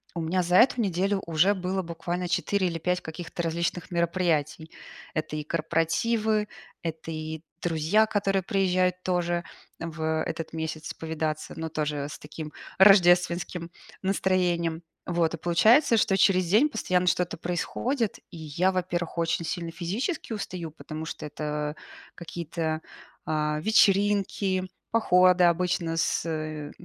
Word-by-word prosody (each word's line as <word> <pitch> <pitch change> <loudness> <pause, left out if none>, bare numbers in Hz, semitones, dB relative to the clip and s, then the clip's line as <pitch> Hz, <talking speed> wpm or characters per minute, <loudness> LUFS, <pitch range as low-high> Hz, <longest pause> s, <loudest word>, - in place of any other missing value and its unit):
у 170 - -2
меня 180 +3 +1
за 180 +1 +1
эту 250 -1 +5
неделю 195 0 0
уже 170 +5 +3
было 190 0 -2
буквально 175 +1 -4
4 200 -2 +1
или 170 -1 -2
5 180 +2 0
каких-то 165 +2 -6
различных 170 +3 -2
мероприятий. 170 -3 0 0.4
Это 155 -1 -3
и 150 - -3
корпоративы, 210 +8 0 0.3
это 165 0 -5
и 155 0 -5 0.2
друзья, 170 +6 +3
которые 195 -2 0
приезжают 185 -1 +1
тоже 175 -1 0 0.4
в 160 -1 -2
этот 165 -1 -5
месяц 160 0 -4
повидаться, 160 -1 -3
но 160 - -3
тоже 150 -2 -2
с - - -8
таким 150 0 -8 0.2
рождественским 175 -3 +5 0.3
настроением. 180 -4 +1 0.2
Вот, 170 -2 +1
и - - -3
получается, 220 - +4
что 200 -2 +3
через 185 -1 +4
день 220 - +4
постоянно 180 -7 0
что-то 180 0 +1
происходит. 210 - -2
И 170 - -9
я, 160 +4 0
во-первых, 175 -2 -2
очень 170 0 0
сильно 170 +1 -3
физически 215 - -3
устаю, 180 -6 -5
потому 155 0 -7
что 160 - -6
это 150 0 -3 0.4
какие-то, 165 -2 -4 0.4
а, 150 -1 0
вечеринки, 200 -1 +3 0.3
походы 180 -5 +5
обычно 175 -1 +1
с 155 -2 -2
175 Hz, 130 wpm, -27 LUFS, 160-185 Hz, 0.4 s, эту